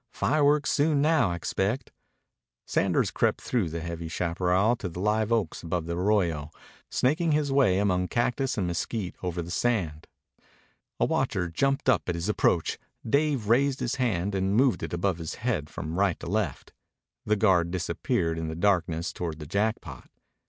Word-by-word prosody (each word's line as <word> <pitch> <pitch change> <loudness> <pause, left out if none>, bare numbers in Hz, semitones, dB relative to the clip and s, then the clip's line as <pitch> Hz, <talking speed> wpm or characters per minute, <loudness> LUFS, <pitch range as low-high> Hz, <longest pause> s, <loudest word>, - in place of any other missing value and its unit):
"Fireworks 150 -1 +2
soon 150 0 +2
now, 150 - +3
I 85 - -2
expect." 100 - -2 0.7
Sanders - - +1
crept - - +1
through 115 -9 -1
the 85 +1 -4
heavy 85 0 -5
chaparral 90 +6 +1
to 100 -7 -4
the 85 - -8
liveoaks 105 -1 0
above 85 0 -2
the 85 0 -3
arroyo, 90 -6 +1 0.4
snaking 155 +5 +1
his 150 -2 +1
way 135 -9 +4
among 90 -2 +1
cactus 125 +4 0
and 95 - 0
mesquite 90 +3 -3
over 90 -1 -3
the 85 - -8
sand. 90 -10 -1 0.9
A - - +3
watcher 90 -2 0
jumped 135 - 0
up 120 -7 +2
at 90 - 0
his 85 +4 -3
approach. 85 -5 +1 0.3
Dave 140 -3 +1
raised 130 +4 +3
his 125 0 -2
hand 100 -5 0
and 95 +1 0
moved 125 -4 +3
it - - -4
above 85 0 -1
his 80 -1 -5
head 110 - -2
from 80 +4 -5
right 100 -4 +2
to - - -8
left. 100 -5 -2 0.5
The 105 - +3
guard 95 -5 +3
disappeared 85 -2 -1
in 80 - -3
the 80 - -4
darkness 85 -3 0
toward 85 -3 -4
the 75 - -8
Jackpot. 105 +7 -2
95 Hz, 165 wpm, -27 LUFS, 85-120 Hz, 0.9 s, way